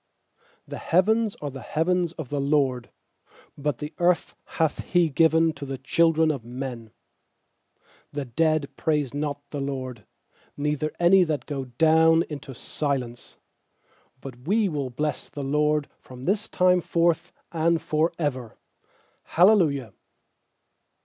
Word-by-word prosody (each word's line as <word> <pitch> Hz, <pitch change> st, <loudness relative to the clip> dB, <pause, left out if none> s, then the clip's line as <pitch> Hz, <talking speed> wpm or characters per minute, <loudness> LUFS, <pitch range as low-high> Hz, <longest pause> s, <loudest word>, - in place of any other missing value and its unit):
16The -, -, -6 dB
heavens 215 Hz, +5 st, +2 dB
are 145 Hz, -, -3 dB
the 135 Hz, 0 st, -8 dB
heavens 170 Hz, +6 st, 0 dB
of 155 Hz, -7 st, -7 dB
the 145 Hz, -1 st, -1 dB
LORD: 135 Hz, -4 st, +1 dB, 0.7 s
But 145 Hz, -3 st, -2 dB
the 150 Hz, +4 st, -6 dB
earth 175 Hz, 0 st, +1 dB, 0.2 s
hath 160 Hz, -2 st, +1 dB
He 175 Hz, -3 st, +2 dB
given 160 Hz, +2 st, +3 dB
to 145 Hz, -, -8 dB
th< 135 Hz, -1 st, -6 dB
children 160 Hz, +1 st, +3 dB
of 135 Hz, -6 st, -5 dB
men. 120 Hz, -1 st, -6 dB, 1.3 s
17The 135 Hz, -5 st, -5 dB
dead 155 Hz, -4 st, +1 dB
praise 150 Hz, -5 st, 0 dB
not 145 Hz, -1 st, -4 dB
the 145 Hz, -, -4 dB
LORD, 130 Hz, -5 st, -5 dB, 0.5 s
Neither 150 Hz, +1 st, -1 dB
any 180 Hz, +2 st, +6 dB
that 155 Hz, -3 st, -2 dB
go 140 Hz, -3 st, -4 dB
down 160 Hz, +5 st, +4 dB
intc 140 Hz, -3 st, -8 dB
silence; 130 Hz, -4 st, -4 dB, 0.9 s
18But 125 Hz, 0 st, -10 dB
we 210 Hz, +2 st, +3 dB
will 145 Hz, -6 st, -3 dB
bless 150 Hz, +5 st, -3 dB
the 145 Hz, -, -6 dB
LORD 150 Hz, +1 st, +1 dB
From 125 Hz, 0 st, -11 dB
this 210 Hz, +3 st, 0 dB
time 180 Hz, -1 st, +3 dB
forth 170 Hz, 0 st, +1 dB, 0.2 s
and 165 Hz, 0 st, +2 dB
for 155 Hz, +2 st, 0 dB
ever. 130 Hz, -8 st, -3 dB, 0.6 s
Hallelujah. 160 Hz, -, +3 dB
150 Hz, 130 wpm, -25 LUFS, 135-165 Hz, 1.3 s, any